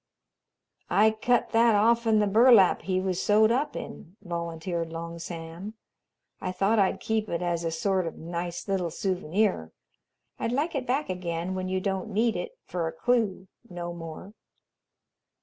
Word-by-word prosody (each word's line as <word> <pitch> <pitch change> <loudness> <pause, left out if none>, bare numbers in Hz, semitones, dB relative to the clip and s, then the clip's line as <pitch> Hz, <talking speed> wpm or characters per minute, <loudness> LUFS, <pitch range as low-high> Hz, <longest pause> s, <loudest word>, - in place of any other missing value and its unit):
"I 215 +2 +5
cut 235 +3 +1
that 230 -1 +5
off'n 225 +1 +3
the 210 - +3
burlap 220 -1 +6
he 185 -1 0
was 185 -1 -1
sewed 215 +1 +4
up 280 +5 0
in," 180 +5 -8
volunteered 170 -1 -4
Long 170 0 -6
Sam, 170 +4 -7 0.7
"I - - -2
thought 200 +4 +2
I'd 195 -2 +2
keep 220 -1 -1
it 170 +1 -2
as 170 -1 -1
a 165 - 0
sort 185 +2 0
of 165 - -6
nice 170 +2 -5
little 190 -3 0
souvenir. 185 - -1 0.7
I'd 230 - -1
like 300 +6 0
it 265 -3 -3
back 270 -1 0
again 175 0 -3
when 185 0 -3
you 185 0 0
don't 190 +1 -2
need 220 +2 +1
it 180 - -5
for 170 -2 -2
a - - -3
clue 205 0 0 0.2
no 175 -1 -5
more." 165 +4 -9
185 Hz, 160 wpm, -27 LUFS, 170-220 Hz, 0.7 s, burlap